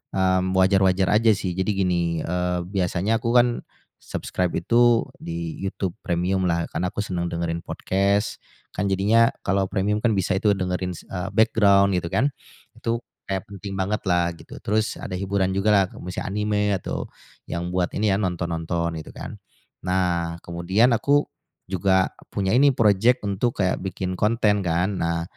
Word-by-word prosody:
mmm, 95 0 +2
wajar-wajar 95 0 +3
aja 110 +1 +5
sih. 95 -2 -3
Jadi 95 +3 -1
gini, 85 -4 0
eee, 90 +1 -1
biasanya 95 +3 0
aku 115 +2 -1
kan 120 0 +7 0.5
subscribe 90 -2 -3
itu 120 +5 +4 0.2
di 85 -1 -5
YouTube 95 -1 -3 0.2
Premiumlah 90 -1 0
karena 90 - -1
aku 105 +3 -3
senang 90 -3 -2
dengerin 85 -1 -2
podcast 100 +4 0 0.3
kan 100 - -2
jadinya 105 +4 +4 0.2
kalau 95 -1 +1
premium 100 +2 0
kan 110 -1 +1
bisa 95 0 +1
itu 105 -1 +3
dengerin, 90 -1 -2
eee, 90 +3 -6
background 100 -3 +4
gitu 85 - -5
kan. 130 - +1 0.5
Itu 115 +1 -2 0.2
kayak 95 -1 -2
penting 100 0 -7
bangetlah 95 -3 0
gitu. - - -12
Terus 110 +1 0
ada - - -7
hiburan 95 -1 0
jugalah 100 0 +2
misalnya 90 +3 -5
anime 105 0 0 0.2
atau - - -4 0.4
yang 85 +1 -4
buat 90 -1 +1
ini 110 - 0
ya - - +3
nonton-nonton 85 -3 -2
gitu - - -12
kan. - - -8 0.4
Nah, 90 -2 0
kemudian 95 +8 +2
aku 145 +5 +3 0.5
juga 95 0 +2 0.2
punya 95 -1 0
ini 140 +3 +5
projek 115 +3 +3
untuk 100 +1 0
kayak 90 - +1
bikin 95 0 -3
konten 105 -1 +2
kan. 90 +4 0
Nah 85 0 0
95 Hz, 150 wpm, -24 LUFS, 90-105 Hz, 0.5 s, kan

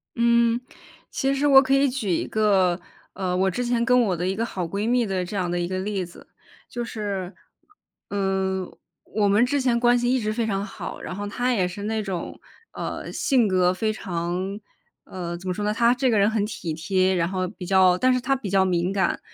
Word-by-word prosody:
嗯， 235 0 +3 0.5
其 270 +1 0
实 280 +2 +1
我 270 -1 +8
可 270 0 0
以 275 +1 +4
举 245 -6 -3
一 170 - 0
个， 195 -5 +2 0.3
呃， 185 -1 -2
我 190 +1 +2
之 245 +8 -2
前 240 -1 +1
跟 250 +1 +4
我 190 -7 0
的 180 +2 -2
一 190 - -1
个 230 +2 -1
好 185 -5 -4
闺 200 +6 -2
蜜 245 -1 +2
的 190 -2 -1
这 190 +4 -6
样 180 -3 -1
的 175 0 -1
一 175 - -1
个 185 0 -3
例 195 -1 -2
子。 175 - -15 0.4
就 240 - -4
是， 200 -4 -4 0.8
嗯， 190 -2 -1 0.3
我 210 -1 0
们 205 +3 +4
之 285 +3 0
前 245 -2 +2
关 240 0 +4
系 245 0 +1
一 260 - +2
直 215 -2 -1
非 230 0 -1
常 200 -2 -1
好， - - -7
然 - - -6
后 205 +1 -4
她 245 +4 -1
也 185 -5 +1
是 195 +3 -7
那 220 +1 -1
种， 190 -4 -5 0.3
呃， - - -5
性 250 -6 +2
格 185 -1 +3
非 215 +3 -1
常 185 +1 -3 0.5
呃， 175 -2 -5
怎 185 - -10
么 185 - 0
说 205 +3 -4
呢， 210 - +1
她 235 +1 +4
这 260 0 +1
个 220 - +3
人 200 +1 +4
很 215 -2 0
体 175 -7 -5
贴， 185 +3 +1
然 170 -1 +1
后 185 -1 -2
比 185 -1 -9
较 185 -1 +4
但 255 +5 +3
是 255 - +1
她 270 +2 +1
比 255 -7 -5
较 190 0 +3
敏 180 0 0
感。 190 -3 0
200 Hz, 240 characters per minute, -24 LUFS, 185-235 Hz, 0.8 s, 我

